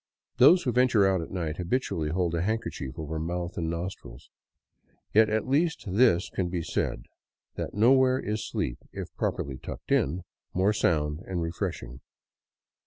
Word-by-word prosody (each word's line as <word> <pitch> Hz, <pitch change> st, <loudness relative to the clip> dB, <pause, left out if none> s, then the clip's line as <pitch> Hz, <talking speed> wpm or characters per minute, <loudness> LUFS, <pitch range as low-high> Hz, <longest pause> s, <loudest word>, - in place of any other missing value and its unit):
Those 160 Hz, +9 st, +7 dB
who 125 Hz, -, +1 dB
venture 120 Hz, -4 st, +4 dB
out 95 Hz, -2 st, +2 dB
at 80 Hz, -, -7 dB
night 80 Hz, -4 st, -3 dB
habitually 90 Hz, -5 st, -1 dB
hold 85 Hz, 0 st, 0 dB
a 85 Hz, -, 0 dB
handkerchief 100 Hz, -, -3 dB
over 80 Hz, 0 st, -4 dB
mouth 85 Hz, +2 st, -3 dB
and 80 Hz, -1 st, -2 dB
nostrils. 85 Hz, -6 st, -6 dB, 0.8 s
Yet 110 Hz, +1 st, +6 dB
at 110 Hz, +2 st, 0 dB
least 160 Hz, +4 st, +1 dB
this 100 Hz, -2 st, +3 dB
can 90 Hz, -2 st, -1 dB
be 85 Hz, -1 st, -2 dB
said, -, -, -2 dB, 0.5 s
that -, -, -5 dB
nowhere 130 Hz, +4 st, +5 dB
is 105 Hz, +1 st, -3 dB
sleep, -, -, -2 dB
if -, -, -7 dB
properly 65 Hz, -2 st, -2 dB
tucked -, -, -8 dB
in, 85 Hz, +6 st, +1 dB, 0.3 s
more 95 Hz, +3 st, +3 dB
sound 75 Hz, -6 st, +1 dB
and 95 Hz, -2 st, -2 dB
refreshing. 65 Hz, -6 st, -4 dB
90 Hz, 155 wpm, -28 LUFS, 80-110 Hz, 0.8 s, Those